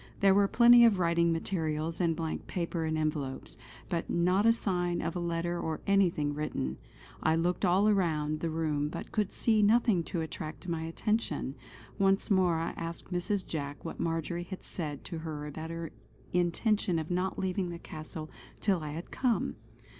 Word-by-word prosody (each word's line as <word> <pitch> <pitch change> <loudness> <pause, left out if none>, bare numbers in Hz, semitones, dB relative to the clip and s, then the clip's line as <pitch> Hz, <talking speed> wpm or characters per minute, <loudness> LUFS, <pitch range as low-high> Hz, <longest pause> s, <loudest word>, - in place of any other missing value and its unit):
There 195 -1 +6
were 200 0 +4
plenty 240 +2 +7
of 225 -4 +6
writing 170 -1 +3
materials 165 -1 -1
and 165 -2 +2
blank 160 -1 -4
paper 170 -2 -2
and 160 0 0
envelopes; 150 -4 -2 0.3
but 170 -3 -2
not 180 +5 +3
a - - +8
sign 180 -6 0
of 165 +1 -2
a - - -1
letter 170 0 -1
or 160 -2 -2
anything 175 -7 +2
written. 105 - -3 0.4
I 160 - +3
looked 175 +4 0
all 195 +4 +4
round 155 -5 0
the 165 - -1
room 155 -2 0
but - - -7
could 210 -3 0
see 220 -2 +2
nothing 215 -3 +4
to 170 - -2
attract 155 0 -6
my 165 -2 -1
attention. 165 - -1 0.5
Once 195 +1 +2
more 185 -3 +4
I 165 - -1
asked 170 +2 -6
Mrs. 185 +2 -1
Jack 145 -2 -5
what 165 - -6
Marjory 170 +1 -2
had 190 +1 -8
said 150 -5 -5
to 170 -3 -5
her 155 -2 -5
about 155 +2 -6
her 165 -1 -5 0.4
intention 180 +2 +1
of 160 +1 -3
not 180 +2 0
leaving 185 -1 -1
the 170 - -5
castle 155 -1 -8 0.3
till 190 -5 +1
I 150 -1 -5
had 165 +3 -7
come. 250 -3 0
170 Hz, 175 wpm, -30 LUFS, 160-190 Hz, 0.5 s, a